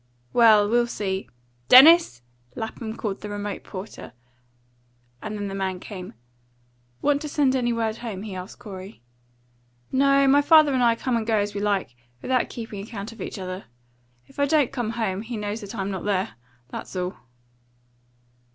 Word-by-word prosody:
"Well, 220 -3 +6
we'll 240 +2 +2
see. 190 - -3 0.4
Dennis!" 265 - +8 0.3
Lapham 220 0 -5
called 200 -3 -3
to 210 - -6
the - - -8
remote 205 -1 -5
porter, 190 - -9 1.1
and 210 -1 -4
the 195 - -5
man 190 -2 -2
came. 185 - -9 0.9
"Want 290 0 +2
to 300 - -5
send 280 -2 +2
any 240 -2 +1
word 225 -1 -1
home?" 215 -5 -6
he 210 -3 -6
asked 185 +1 -8
Corey. 190 - -10 0.9
"No; 275 +1 +4
my 280 +2 +6
father 305 -1 +6
and 255 - +1
I 235 -1 +4
go 255 +2 -2
and 225 -1 -2
come 225 -2 +2
as 205 0 -1
we 200 - -3
like, 200 -11 -1 0.3
without 255 -1 +1
keeping 225 -4 -7
account 210 0 -7
of 230 - -12
each - - -5
other. 185 0 -6 0.6
If - - -15
I 285 - +3
don't 295 -4 +3
come 240 -4 -2
home, 220 -4 -2
he 230 +1 -6
knows 210 +2 -4
that 205 +2 -8
I'm 195 -1 -3
not 190 -2 -4
there. 200 0 0 0.4
That's - - -7
all." 180 +1 -3
215 Hz, 170 wpm, -24 LUFS, 195-245 Hz, 1.1 s, Dennis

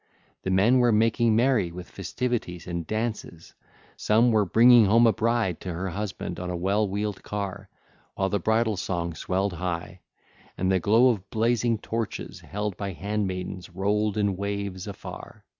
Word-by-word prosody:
The - - -3
men 105 +7 +4
were 120 -1 +4
making 115 +1 +3
merry 120 -7 +2
with 90 +1 -8
festivities 100 -2 -3
and 85 -2 -4
dances; 110 -6 -4 0.4
some 115 +3 +3
were 110 -2 +3
bringing 115 +4 +6
home 115 +4 +5
a 115 - +5
bride 115 -4 0
to 90 - -4
her 95 +3 -3
husband 100 +2 -5
on 90 0 -4
a 90 - -2
well 100 +4 +1
wheeled 100 0 -3
car, 100 -1 -5 0.5
while 95 - 0
the 100 +1 0
bridal 110 +2 +1
song 85 -2 -2
swelled 95 +4 -1
high, 90 +1 -4 0.6
and 95 +1 +1
the 95 - +3
glow 115 +8 +5
of 100 -5 -2
blazing 115 0 +1
torches 115 +1 -4
held 105 -1 -4
by 100 -2 -4
handmaidens 95 -2 -3
rolled 105 +3 0
in 100 -2 +1
waves 100 -1 -4
afar. 100 - -9
100 Hz, 160 wpm, -26 LUFS, 95-110 Hz, 0.6 s, bringing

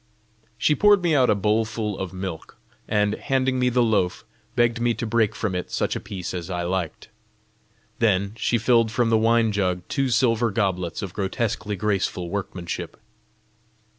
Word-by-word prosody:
She 150 - +3
poured 205 +3 +4
me 170 -2 +2
out 130 -4 +4
a - - +4
bowlful 110 +1 -1
of 95 -2 -4
milk, 95 -3 -7 0.3
and, 105 -1 +1
handing 130 -1 0
me 125 0 +3
the 125 0 +2
loaf, 105 -6 0 0.3
begged 120 -1 +2
me 120 -1 +2
to - - -4
break 110 -1 +1
from 105 -4 -2
it 90 -1 -3
such - - -1
a - - -2
piece 90 -3 -6
as 90 -1 -5
I 90 -1 -2
liked. 90 -2 -3 0.9
Then 100 -3 +2
she 115 +2 +1
filled 115 -1 +3
from 115 0 +1
the - - +5
wine 115 0 +3
jug 90 -3 -1
two 135 -1 0
silver 115 -1 +2
goblets 95 -4 -1
of 95 - -6
grotesquely 105 +1 -2
graceful 95 -3 -1
workmanship. 90 -3 -5
105 Hz, 165 wpm, -24 LUFS, 95-115 Hz, 0.9 s, the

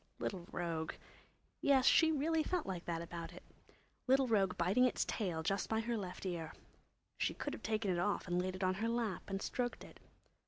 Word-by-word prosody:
Little 180 -3 -4
rogue! 165 -2 -2 0.7
Yes, 270 -2 +4
she 320 +2 +6
really 315 +2 +2
felt 350 +1 -1
like 180 -3 -4
that 170 -1 -2
about 170 0 -6
it. - - -11 0.6
Little 265 0 +5
rogue 195 -5 +2
biting 190 +9 +4
its 250 - +1
tail 175 -7 -2
just 195 +4 0
by 220 - +1
her 235 +1 -1
left 190 -3 -5
ear. 165 -4 -3 0.7
She - - +1
could 290 - -3
have - - -7
taken 215 -3 0
it 175 - 0
off 205 +1 0
and 175 0 +1
laid 185 0 -2
it 185 - -4
on 185 0 +3
her 230 - +1
lap 230 -6 -1
and 195 0 -2
stroked 245 -1 -2
it. - - -13
195 Hz, 200 wpm, -36 LUFS, 175-240 Hz, 0.7 s, she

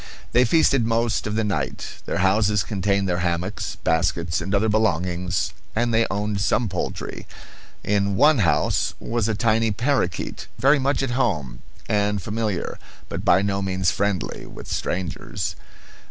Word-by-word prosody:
They 125 +1 +5
feasted 140 -2 +4
most 115 -1 0
of 105 - -2
the 110 - +1
night. 105 -2 -3
Their - - -1
houses 105 0 +3
contained 100 +1 0
their 90 -1 0
hammocks, 85 +2 -2
baskets, 85 +1 +1
and 95 +4 -1
other 105 +3 +2
belongings, 90 -4 0 0.2
and 115 +1 +1
they 115 +1 +3
owned 100 +1 -1
some 115 +3 +2
poultry. 90 - -4 0.6
In 100 -1 +1
one 150 +5 +5
house 85 -6 +2
was 115 -2 -1
a 110 - 0
tiny 115 0 +2
parakeet, 110 -5 -1
very 140 +2 +4
much 135 +1 +1
at 130 - -1
home, 80 - -1 0.3
and 105 0 +1
familiar, 105 -1 -3 0.3
but - - -4
by 90 +2 +4
no 100 0 0
means 95 -1 +1
friendly, 100 -3 -2
with - - -10
strangers. 90 -3 -3
100 Hz, 150 wpm, -23 LUFS, 90-115 Hz, 0.6 s, They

